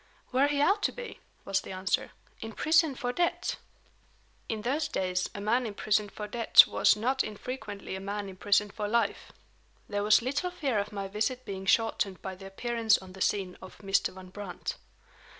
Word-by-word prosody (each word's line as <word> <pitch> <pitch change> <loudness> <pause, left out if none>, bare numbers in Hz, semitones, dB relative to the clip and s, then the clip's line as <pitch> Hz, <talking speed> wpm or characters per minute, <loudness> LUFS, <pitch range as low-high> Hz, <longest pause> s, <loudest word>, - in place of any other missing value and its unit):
"Where 265 +3 +3
he 290 -1 0
ought 400 +6 +3
to - - +1
be," - - -8 0.3
was 195 0 +1
the - - -8
answer. 185 0 0 0.3
"In 225 0 -7
prison 315 0 +3
for 245 0 -2
debt." 345 +3 0 0.9
In 215 -1 -3
those 290 +6 0
days 185 -7 -1
a - - -4
man 230 +4 +1
imprisoned 210 0 0
for 210 - -6
debt 230 +2 +7
was - - +4
not 255 +5 +1
infrequently 210 -2 -6
a - - -5
man 200 +1 -4
imprisoned 200 +2 +1
for 210 -1 -3
life. 225 -1 0 0.6
There 205 -1 -2
was 210 +2 +5
little 280 +8 -1
fear 280 -11 -1
of 205 +1 -3
my 200 -2 -4
visit 220 +6 -2
being 190 -1 -6
shortened 215 -4 +2
by 190 - -5
the 195 +1 -10
appearance 230 +2 +2
on 185 -1 -12
the 190 - -11
scene 185 -3 0
of 185 - -11
Mr. 195 -1 +1
Van 185 0 -12
Brandt. 200 -1 -6
210 Hz, 185 wpm, -29 LUFS, 195-250 Hz, 0.9 s, debt